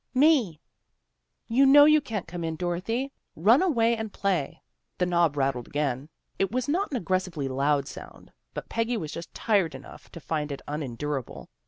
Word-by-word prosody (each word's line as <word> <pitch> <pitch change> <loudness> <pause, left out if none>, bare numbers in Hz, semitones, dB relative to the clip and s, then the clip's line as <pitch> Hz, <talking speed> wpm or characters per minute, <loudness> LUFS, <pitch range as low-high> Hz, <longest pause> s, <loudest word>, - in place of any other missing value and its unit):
" - - -51
"Me." 230 - +2 0.4
' - - -53 0.2
You 245 +4 +3
know 290 +2 +9
you 305 0 +5
can't 220 -9 -5
come 170 0 -6
in, 160 -1 -2
Dorothy. 185 - -2 0.2
Run 220 - +5
away 235 -11 +2
and 220 -2 -5
play." 170 -6 -2 0.3
The 180 - +1
knob 170 -4 +2
rattled 135 -3 -1
again. 145 -1 -2 0.3
It 195 0 +1
was 255 +1 -1
not 365 +8 0
an 270 - -2
ag 190 - -7
gressively 185 -6 -1
loud 140 +1 +1
sound, - - -11 0.2
but - - -5
Peggy 230 +1 -1
was 155 -7 -5
just 170 - -7
tired 195 -10 +1
enough 135 - -12
to 170 - -8
find 150 -2 -3
it 140 - -6
unendurable. 145 -2 -4
175 Hz, 185 wpm, -27 LUFS, 150-230 Hz, 0.4 s, know